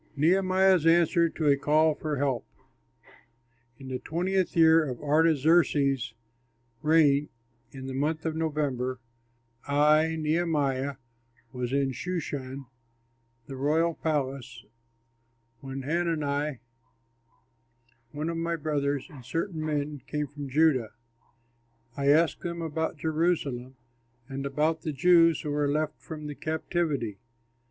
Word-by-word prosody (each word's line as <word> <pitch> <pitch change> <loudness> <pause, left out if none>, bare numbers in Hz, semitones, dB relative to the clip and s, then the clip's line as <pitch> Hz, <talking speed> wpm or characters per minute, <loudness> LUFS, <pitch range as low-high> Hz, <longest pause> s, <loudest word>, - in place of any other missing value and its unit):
NEHEMIAH'S 185 +2 +3
ANSWER 170 0 +4
TO 160 - -4
A 140 - +6
CALL 155 +2 +3
FOR 150 0 -3
HELP 135 -4 0 1.3
In 135 -1 -10
the 130 -1 -3
twentieth 180 +5 -1
year 160 0 +6
of 130 -5 -5
Artaxerxes' 145 -4 +2 0.7
reign, 150 -2 +3 0.4
in 135 -1 -9
the 135 - -5
month 155 +4 -1
of 160 -1 -1
November, 140 -6 -2 0.7
I 150 +3 +3
(Nehemiah) 150 -4 0 0.6
was 125 -1 -3
in 135 -1 +1
Shushan, 140 -3 -5 0.8
the 135 - -8
royal 155 +5 +1
palace, 135 -6 -3 0.9
when 135 +1 -6
Hanani, 150 -3 -1 1.5
one 150 +2 -3
of 165 - -4
my 170 +1 -1
brothers, 145 -3 -1
and 145 -8 -13
certain 165 - -3
men 150 -2 -2
came 150 -1 -2
from 145 0 -8
Judah. 135 -6 +2 1.0
I 140 0 -2
asked 160 +3 +4
them 170 -1 -4
about 160 0 -2
Jerusalem 150 -5 -1 0.5
and 135 0 -4
about 155 +3 0
the 155 - -3
Jews 165 +2 +4
who 150 - -4
were 145 -1 0
left 155 +1 -2
from 155 -2 -8
the 150 - -5
captivity. 155 - -2
150 Hz, 115 wpm, -27 LUFS, 140-160 Hz, 1.5 s, A